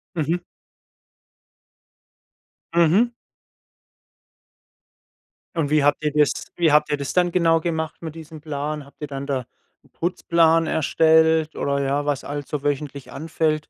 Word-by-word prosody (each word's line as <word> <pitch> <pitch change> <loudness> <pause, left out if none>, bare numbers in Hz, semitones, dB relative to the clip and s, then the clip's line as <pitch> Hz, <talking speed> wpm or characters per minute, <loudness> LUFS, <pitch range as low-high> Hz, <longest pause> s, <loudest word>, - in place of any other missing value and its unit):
Mhm. 165 +2 0 2.4
Mhm. 175 +8 +4 2.4
Und 160 -4 0
wie 150 -2 +3
habt 145 +1 +2
ihr 150 - +1
das 150 -2 +3 0.3
wie 165 -3 +3
habt 150 0 +4
ihr 145 - +1
das 140 -1 -4
dann 180 -1 +2
genau 165 -2 +3
gemacht 160 -1 -3
mit 160 -1 -7
diesem 160 -1 -10
Plan? 150 -1 -4
Habt 140 - -21
ihr 150 - -3
dann 140 -1 -6
da 135 -3 -2 0.4
'n - - -25
Putzplan 165 -2 +2
erstellt 160 0 +3
oder 140 0 -1
ja, 140 +1 0
was 145 -2 -1
alles 145 -1 -5
so 145 -2 -3
wöchentlich 145 -1 -3
anfällt? 155 0 -1
155 Hz, 135 wpm, -22 LUFS, 145-165 Hz, 2.4 s, Mhm